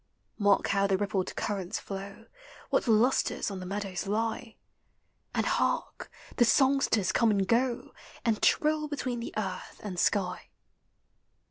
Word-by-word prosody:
93 - - -3
Mark 205 -1 +4
how 200 0 +2
the 195 -1 +2
rippled 195 -2 -2
currents 195 -4 -3
flow; 200 +3 -8 0.5
What - - +1
lustres 230 0 +2
on 195 - -5
the 185 - -7
meadows 195 -1 -4
lie! 225 +2 -2 0.8
And - - +1
hark! - - -1 0.3
the 240 - +6
songsters 260 -7 +3
conic 220 -2 +3
and 190 - -1
go, 245 +1 0 0.3
And 225 -3 +1
trill 305 0 +2
between 255 -4 -3
the 235 - -5
earth 190 -3 -4
and 190 -4 -4
sky. 185 -2 0
210 Hz, 140 wpm, -29 LUFS, 195-240 Hz, 0.8 s, the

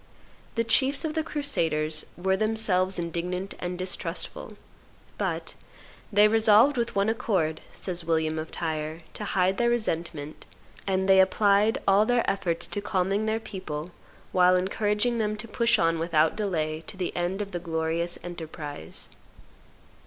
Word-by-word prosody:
The 230 - +2
chiefs 270 +6 +2
of 310 - -2
the 320 - 0
crusaders 160 - 0
were 190 +2 +1
then 215 +2 0
selves 185 -3 +2
indignant 180 +3 -3
and 180 0 -4
distrustful; 185 +1 -5 0.6
but - - -2 0.6
"they 205 +1 +6
resolved 225 +5 +5
with 235 -4 -1
on 200 +1 +3
accord," 195 -9 0
says 175 -2 -3
William 160 -1 0
of 155 - -5
Tyre, 160 0 -4
"to - - -6
hide 190 -1 +1
their 235 0 +3
resentment, 165 -10 -3 0.4
and 190 0 +1
they 190 0 +6
applied 200 +3 +4
all 200 +2 +5
their 245 -1 +2
efforts 175 -3 0
to 205 - -4
calming 200 +1 0
their 220 +1 +1
people, 185 -7 -6 0.4
while 180 0 +5
encouraging 210 +5 +1
them 215 -1 0
to 220 +2 -6
push 235 0 +2
on 165 -3 +2
without 160 -1 +2
delay 160 -7 -2
to 195 - -8
the 180 -2 -3
end 175 +3 -1
of 200 -1 -4
the 175 - -3
glorious 165 +1 -1
enterprise." 160 - -6
190 Hz, 150 wpm, -27 LUFS, 165-215 Hz, 0.6 s, they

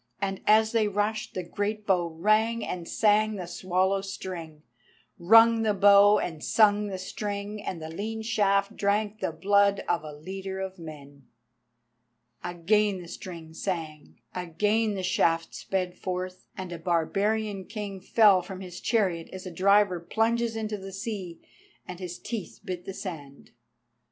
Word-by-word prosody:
And 195 -1 -2
as 220 +1 +5
they 225 -2 +2
rushed, 210 +2 -2
the 185 - -2
great 205 +4 -3
bow 180 -4 +2
rang 215 +7 +1
and 175 -2 -5
sang 215 0 +3
the 185 -3 -5
swallow 185 +2 0
string—rung 175 - +1
the 215 -2 +1
bow 200 +1 +7
and 160 -3 -4
sung 210 -1 +4
the 195 -2 -4
string, 205 +2 -5
and 185 -4 -5
the 160 - -6
lean 220 +5 -4
shaft 205 -2 +1
drank 210 +1 0
the - - -1
blood 200 0 +3
of 170 -2 0
a 155 - -7
leader 190 +5 -6
of 190 -1 -5
men. 145 -4 -11 1.2
Again 195 +3 +1
the 175 - -10
string 165 -2 -9
sang, 160 -4 -5
again 210 +5 0
the 190 - -4
shaft 165 -2 +1
sped 180 -2 -2
forth, 185 0 -4
and 185 -2 -6
a 170 - -6
barbarian 195 +4 0
king 205 -2 -6
fell 200 -1 +5
from 185 +1 -8
his 180 -2 -8
chariot 185 -8 0
as 185 0 -8
a 185 - -6
diver 195 +1 +3
plunges 225 +6 0
into 215 -2 -3
the 195 0 -8
sea, 195 -4 -5 0.5
and 180 -1 -7
his 180 -2 -6
teeth 225 -6 -6
bit 180 -1 -5
the 195 - -5
sand. 145 -9 -8
195 Hz, 150 wpm, -27 LUFS, 175-210 Hz, 1.2 s, bow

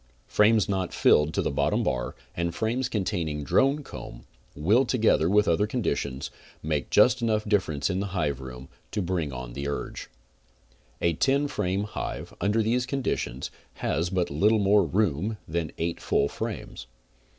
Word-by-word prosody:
Frames 105 0 +4
not 95 -2 -2
filled 75 +1 +4
to - - +1
the - - 0
bottom - - +1
bar - - -2 0.2
and 85 0 -2
frames 120 +3 -1
containing 85 -8 -2
drone 135 - +2
comb; - - -9 0.3
will, 105 - +3
together 110 -11 +2
with 105 +1 +4
other 85 +5 +2
conditions, 85 - -2 0.3
make 75 -4 -1
just 125 +4 +5
enough 110 -2 +1
difference 85 -8 +1
in 95 0 -1
hive 85 -9 -1
room 65 0 -9 0.3
to 105 - -1
bring 85 -5 -1
on 65 -2 -7
the 70 +2 -4
urge. 70 - -5 0.9
The 85 - +2
ten 140 - +2
frame 95 -6 -1
hive, 105 - -5
under 105 +4 +2
these 120 +3 +1
conditions, 125 - -2 0.2
has 80 +5 -1
but 90 -4 -1
little 105 +10 +3
more 100 0 +4
room 100 +1 0
than 80 -2 -2
eight 85 0 -2
full 70 - +1
frames. - - -6
95 Hz, 155 wpm, -27 LUFS, 75-110 Hz, 0.9 s, just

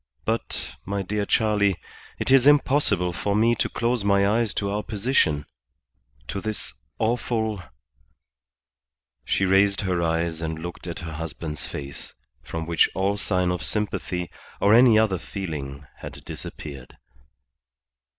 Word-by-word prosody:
"But, 115 +1 -3
my 100 0 -2
dear 105 +2 -1
Charley, 105 -3 +3 0.4
it - - -1
is 135 0 +6
impossible 140 -11 +4
for 100 +4 -1
me 115 +3 +4
to 110 - 0
close 120 -1 0
my 100 0 +4
eyes 110 +1 +2
to 100 -1 -1
our 105 +1 -1
position; 105 - +1 0.8
to 100 - -3
this 110 -3 -2 0.2
awful.. 110 -2 0 0.8
." - - -56
She 95 - +1
raised 100 +1 +4
her 90 -3 0
eyes 80 0 0
and 80 -1 -3
looked 85 +2 -7
at 85 - -5
her 80 - -6
husband's 75 -1 -5
face, 70 -1 -7 0.3
from 80 -1 -5
which 85 0 +3
all 95 +2 +1
sign 90 -2 +1
of 90 - -3
sympathy 90 -4 -2 0.3
or 100 +1 +5
any 120 -1 +7
other 105 -5 +3
feeling 70 -8 -5
had - - -9
disappeared. 70 -4 -8
95 Hz, 140 wpm, -25 LUFS, 80-110 Hz, 0.8 s, any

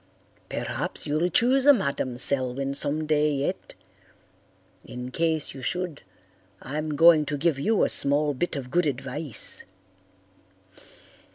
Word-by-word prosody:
Perhaps - - -3
you'll 155 +4 0
choose 255 - +2
a 290 - +9
Madam 140 - -3
Selwyn 135 +1 -1
some 145 +2 -1
day 150 0 +1
yet. 140 -1 -4 1.1
In 125 +1 -8
case 160 0 0
you 135 - -10
should 175 +3 -4 0.6
I'm 150 +2 -4
going 165 0 +6
to 145 - -2
give 150 -1 0
you 215 +8 +1
a - - +3
small 145 +1 +3
bit 170 +5 -3
of 130 -3 -7
good 175 0 +1
advice. 135 0 0
150 Hz, 125 wpm, -25 LUFS, 135-165 Hz, 1.1 s, a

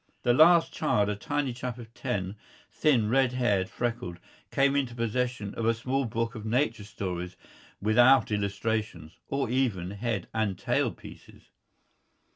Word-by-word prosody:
The 120 - +4
last 165 +5 +6
child, 105 -9 +1
a 105 - -1
tiny 145 +4 -2
chap 125 0 -5
of 115 -1 -11
ten, 100 -7 -3 0.4
thin, 125 -8 +2
red 130 +2 +2
haired, 105 -7 +1
freckled, 115 -8 -3 0.3
came 140 0 +2
into 130 -4 -1
possession 115 -2 -2
of 115 - -2
a 115 - +3
small 130 +4 -1
book 115 +1 -2
of 110 -3 -7
nature 115 -1 0
stories 90 -3 -5 0.4
without 120 +5 +5
illustrations 100 -4 -2
or 135 -1 0
even 110 -9 0
head 110 +4 -3
and 110 -4 0
tail - - +1
pieces. - - -14
115 Hz, 145 wpm, -28 LUFS, 105-125 Hz, 0.4 s, last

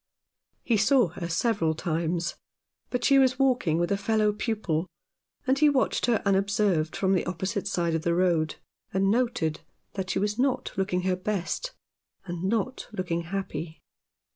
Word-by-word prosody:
He 230 - +2
saw 230 0 +4
her 170 +1 -6
several 170 -3 +1
times, 170 +1 -1 0.6
but 250 -1 -2
she 275 -1 +6
was 260 -1 +3
walking 255 - +2
with 175 +3 0
a 200 - +2
fellow 210 +1 +1
pupil, 200 -7 -1 0.6
and 265 +1 +2
he 300 0 +6
watched 270 -3 +1
her 235 -3 +2
unobserved 195 -4 +1
from 190 0 +1
the 185 - +2
opposite 190 +3 -2
side 170 -4 0
of 160 - 0
the 170 0 +1
road, 170 -3 +2 0.4
and 195 +1 +2
noted 220 -10 0 0.3
that 190 -1 -4
she - - 0
was 205 +3 -1
not 265 0 +1
looking 190 -1 0
her 185 0 +1
best, 205 - -3 0.5
and 175 -1 -5
not 225 +6 -1
looking 185 -5 -2
happy. 170 -3 -5
195 Hz, 160 wpm, -27 LUFS, 170-225 Hz, 0.6 s, she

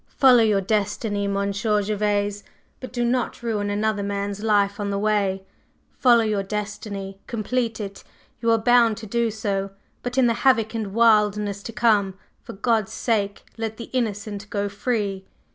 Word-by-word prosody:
Follow 255 -3 +7
your 210 -3 +3
destiny, 205 0 -1
Monsieur 200 +1 0
Gervase, 205 0 -1 0.4
but 255 - -8
do 240 -1 -1
not 240 0 -1
ruin 210 -3 -1
another 210 0 0
man's 200 0 -3
life 205 -2 +2
on 205 -1 -2
the 200 - -1
way. 200 -2 0 0.5
Follow 240 -3 +4
your 210 -2 0
destiny, 200 -1 -5
complete 230 0 -2
it, 200 -2 -7 0.4
you 230 - +1
are 225 - +5
bound 230 -1 +4
to 225 - -8
do 235 +2 0
so, 200 -2 -2 0.3
but 245 +1 -5
in 260 - +5
the 235 - +3
havoc 230 -5 +3
and 215 -3 -4
wildness 210 -3 +3
to 230 - -7
come, 210 -4 +2 0.3
for - - -9
God's 220 0 0
sake, 205 -4 -1 0.2
let 220 -1 -3
the 235 - -9
innocent 210 -4 -3
go 205 -1 -1
free!" 200 -3 -2
210 Hz, 160 wpm, -23 LUFS, 200-230 Hz, 0.5 s, Follow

